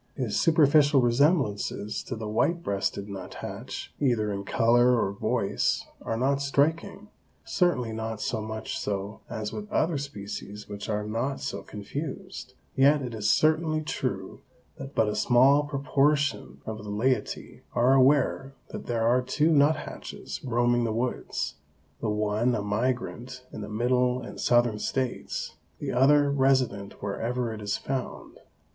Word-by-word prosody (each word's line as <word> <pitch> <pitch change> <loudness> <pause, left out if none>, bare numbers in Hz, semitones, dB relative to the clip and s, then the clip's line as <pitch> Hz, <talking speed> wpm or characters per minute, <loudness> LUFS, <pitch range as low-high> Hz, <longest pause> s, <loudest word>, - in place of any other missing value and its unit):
His 125 -6 -1
superficial 150 -3 +5
resemblances 120 - +1
to 125 - -4
the 110 -1 -5
white 165 +11 +1
breasted 100 0 -2
nuthatch, 100 -2 -7
either 115 -6 +1
in 100 0 -4
color 120 +2 +4
or 95 - 0
voice, 100 - 0 0.2
are 115 - -2
not 135 +3 +1
striking, 160 +8 0 0.4
certainly 135 - +1
not 110 -1 -4
so 115 -2 -2
much 110 0 -4
so 100 +1 -3
as 110 -2 -4
with 210 0 -7
other 160 -6 +1
species 105 -5 -7
which 100 0 -7
are 105 -1 -1
not 115 +6 -2
so 140 - -4
confused, 135 - -7 0.2
yet 140 +1 +4
it 125 -2 -5
is 110 -1 -1
certainly 155 +4 +2
true - - -4 0.4
that 135 +1 -8
but 110 - +3
a 105 - -1
small 135 +4 +4
proportion 140 - 0
of 110 -1 -5
the 105 - -8
laity 125 +6 -1
are 125 +3 +4
aware 135 0 +3
that - - -7
there 115 -2 0
are 125 +2 +4
two 150 +5 +1
nuthatches 150 0 0
roaming 120 -1 +2
the 115 - 0
woods, 120 +3 -2 0.4
the 110 - -2
one 105 +3 +1
a 105 - -2
migrant 125 +3 -2
in - - -6
the 105 - -6
Middle 125 +3 +1
and - - -8
Southern 120 -3 +3
States, 130 +2 -3 0.2
the - - -4
other 140 +3 +4
resident 130 -9 +1
wherever 115 +4 -2
it 110 - -8
is 100 -1 -1
found. 130 -2 -5
125 Hz, 145 wpm, -27 LUFS, 110-140 Hz, 0.4 s, superficial